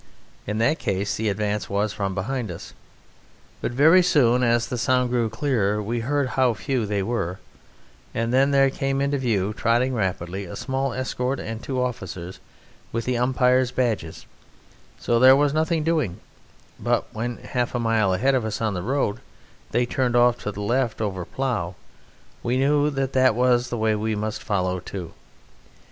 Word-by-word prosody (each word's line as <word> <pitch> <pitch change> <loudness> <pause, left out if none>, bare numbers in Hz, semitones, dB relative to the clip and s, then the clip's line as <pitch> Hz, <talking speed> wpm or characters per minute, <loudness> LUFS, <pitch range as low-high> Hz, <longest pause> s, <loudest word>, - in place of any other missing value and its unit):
In 105 +1 -2
that 115 +8 +2
case 100 +1 -1
the 110 0 -1
advance 105 +1 -2
was 100 +1 0
from 95 -2 -3
behind 115 +3 -2
us. 85 - -8 0.9
But - - -2
very 155 +9 +6
soon, 125 -8 +3
as 120 -1 +2
the 120 0 -4
sound 125 0 +2
grew 120 -2 +1
clearer, 110 -4 0
we 115 +3 -2
heard 140 +3 0
how 125 -2 +2
few 115 +3 -2
they 100 -1 -1
were, 95 -5 -2 0.7
and 115 +1 -2
then 135 +2 +4
there 135 -1 +4
came 135 0 -1
into 140 0 0
view, 105 -5 0
trotting 120 +3 +1
rapidly, 95 -3 -2
a 85 - -8
small 135 0 -2
escort 130 +1 -2
and 115 +1 -5
two 130 0 -3
officers 95 -7 -4 0.5
with 115 0 -2
the 125 - 0
umpires' 125 0 +3
badges, 115 -11 -2 0.7
so 120 -1 +1
there 130 +2 +8
was 145 0 +2
nothing 160 +1 +1
doing; 155 - 0 0.6
but - - 0
when, 120 +2 -3
half 125 -1 -3
a - - 0
mile 115 -4 +2
ahead 130 +10 +2
of 130 -3 +1
us 110 -1 -3
on 110 -2 0
the 90 - -3
road, 125 0 -1 0.5
they 120 +2 +1
turned 125 0 0
off 120 0 +5
to 105 - -4
the 105 - -7
left 120 +2 0
over 95 -5 -3
plough, 110 -10 -2 0.7
we 120 +2 0
knew 145 +2 +3
that 135 -2 -2
that 130 -3 +4
was 125 0 +2
the 120 - -3
way 110 0 +2
we 110 +1 -1
must 105 +1 -3
follow 90 -2 -1
too. 90 -1 -7
120 Hz, 175 wpm, -24 LUFS, 105-130 Hz, 0.9 s, there